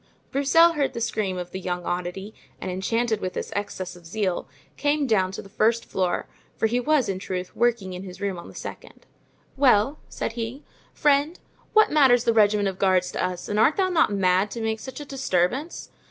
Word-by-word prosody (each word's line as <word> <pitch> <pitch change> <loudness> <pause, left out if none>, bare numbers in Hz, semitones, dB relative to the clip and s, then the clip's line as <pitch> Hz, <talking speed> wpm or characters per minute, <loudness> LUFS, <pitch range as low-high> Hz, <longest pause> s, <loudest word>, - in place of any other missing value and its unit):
Broussel 305 +5 +5
heard 290 -3 0
the - - -4
scream 215 -5 -1
of 180 0 -6
the 190 - -5
young 180 -1 -3
oddity, 180 +4 -4 0.3
and, 185 - -4
enchanted 220 +4 0
with 185 - -3
this - - -5
excess 200 -3 -4
of 175 -2 -14
zeal, 190 -1 -2 0.3
came 290 0 +1
down 190 -6 +2
to - - -6
the - - -12
first 225 +3 +1
floor, 185 -2 -1 0.3
for - - +1
he 235 +3 +1
was, 290 0 +2
in 190 -1 -2
truth, 185 -1 -5
working 230 -5 +1
in 180 - -6
his 185 -1 -9
room 200 -3 -2
on - - -10
the - - -13
second. - - -9 0.5
"Well," 265 0 +4
said - - -3
he, 235 +4 -5 0.3
"friend, 295 +2 +2 0.4
what 435 0 +5
matters 265 -5 +5
the 230 - +2
regiment 210 -2 +4
of 190 -1 -4
guards 185 -2 +2
to - - -2
us, 180 -1 -3
and 210 0 -1
art 270 +8 +4
thou 380 -1 +2
not 330 - +3
mad 190 0 +2
to 230 - -6
make 220 0 -1
such 265 +5 -8
a 295 - -7
disturbance? 265 - -1
215 Hz, 205 wpm, -25 LUFS, 185-265 Hz, 0.5 s, Broussel